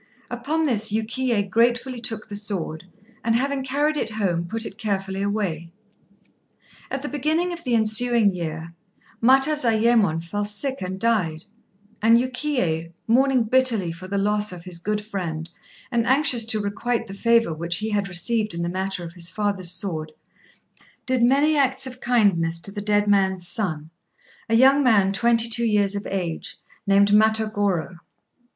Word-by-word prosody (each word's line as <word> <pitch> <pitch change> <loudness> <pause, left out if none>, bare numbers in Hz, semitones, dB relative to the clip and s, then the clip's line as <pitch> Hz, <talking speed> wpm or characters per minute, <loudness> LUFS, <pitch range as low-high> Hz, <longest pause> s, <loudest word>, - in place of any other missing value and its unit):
Upon 290 +7 -1
this 220 -6 +1
Yukiyé 225 0 -1
gratefully 240 +4 +1
took 220 -2 -3
the 205 - -7
sword, 185 -6 -3 0.4
and 230 0 +1
having 275 +2 0
carried 290 +3 0
it 275 - -1
home 185 -6 -1
put 225 +4 -3
it - - -9
carefully 195 -3 -2
away. 195 -5 -2 1.2
At 270 0 -4
the - - -3
beginning 310 +5 0
of 340 -1 -8
the 245 -2 +1
ensuing 220 -1 +2
year 165 -1 -5 0.5
Matazayémon 235 - +3
fell 205 +5 -3
sick 235 +7 -3
and 185 +1 -4
died, 185 -9 0 0.6
and 225 +2 +6
Yukiyé, 245 - -1
mourning 255 +1 +3
bitterly 225 -6 +2
for 175 +3 -9
the 200 +1 -2
loss 210 +1 0
of 175 -2 -9
his 180 -2 -7
good 210 +3 -3
friend, 170 -6 -5 0.4
and 235 -2 0
anxious 260 -4 +3
to 220 -1 0
requite 210 +4 -2
the 195 - -9
favour 230 -2 +2
which 170 +2 -3
he 215 +1 -3
had 205 -1 0
received 210 +2 0
in 170 - -3
the 170 - -2
matter 190 0 -3
of 170 0 -8
his 170 -1 -2
father's 200 -4 -1
sword, 165 -4 -2 0.9
did 260 -2 +1
many 280 +6 +4
acts 265 -2 +2
of 255 -1 -7
kindness 195 -9 +2
to 200 - -5
the 205 0 -5
dead 205 0 +1
man's 190 -3 +1
son 160 -8 -3 0.6
a 225 - +3
young 270 +4 +6
man 205 -7 +3
twenty 230 +2 +2
two 235 +1 -1
years 205 -3 +2
of 200 0 -5
age, 175 -4 -4 0.3
named 200 +1 +4
Matagorô. 210 -4 +1
210 Hz, 160 wpm, -23 LUFS, 185-240 Hz, 1.2 s, and